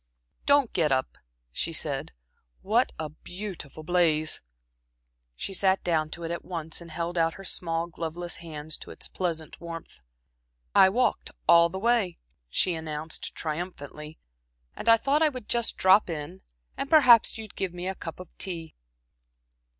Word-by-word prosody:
"Don't 285 -4 +4
get 160 -5 +2
up," 130 0 0 0.4
she 165 - -2
said. 145 -4 -2 0.5
"What 230 +6 +3
a 160 - -3
beautiful 175 -2 -8
blaze!" 155 -2 +2 0.9
She 195 - -5
sat 190 0 +2
down 160 -3 +1
to 170 - -9
it 165 - -3
at 170 - -4
once 165 -2 -4
and 170 - -10
held 170 +2 -2
out 165 +1 +2
her 195 - -10
small, 165 -2 0
gloveless 170 +1 -5
hands 155 -2 -6
to - - -11
its - - -5
pleasant 165 -4 -3
warmth. 165 - -8 0.7
"I 190 - +8
walked 240 +3 +1 0.2
all 170 0 +7
the 190 - -5
way," 225 -4 +2 0.3
she 180 - +2
announced, 155 -1 -4
triumphantly, 155 -2 -5 0.6
"and 230 - -1
I 230 - +8
thought 280 +6 +1
I 315 - +6
would 255 -6 -8
just 235 -1 +1
drop 190 +1 +5
in, 160 +3 -5 0.3
and 275 - -4
perhaps 250 -10 +7
you'd 220 -2 -9
give 190 -2 -2
me 180 +1 -5
a 190 - -1
cup 165 -3 -8
of 185 -2 -11
tea." 165 -4 -3
170 Hz, 160 wpm, -27 LUFS, 160-195 Hz, 0.9 s, I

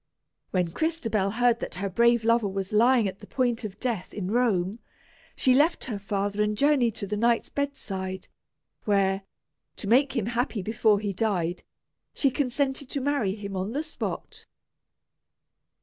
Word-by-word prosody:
When 180 -2 0
Crystabell 225 - 0
heard 240 0 +3
that - - -5
her 195 +3 -2
brave 235 +4 +3
lover 230 -1 +3
was 195 0 -4
lying 235 0 +4
at 190 0 -6
the 205 - -12
point 245 -3 0
of 205 -3 -6
death 230 -8 -3
in 195 -2 -3
Rome, 215 -4 +1 0.6
she 255 - +3
left 300 +6 +3
her 220 -6 -4
father 200 +1 -1
and 210 0 0
journeyed 265 -5 +3
to 205 - -4
the 205 +2 -3
knight's 235 +2 +2
bedside, 195 -10 -4 0.6
where, 195 -2 +2 0.5
to - - -7
make 260 +6 +4
him 225 - 0
happy 235 -3 -1
before 215 0 +2
he 205 -1 -2
died, 180 -4 -1 0.5
she 275 - +2
consented 270 0 -1
to 285 - -2
marry 260 -8 0
him 200 -2 -6
on 190 +4 -3
the 295 +3 -1
spot. 310 - -6
220 Hz, 160 wpm, -27 LUFS, 195-250 Hz, 0.6 s, lying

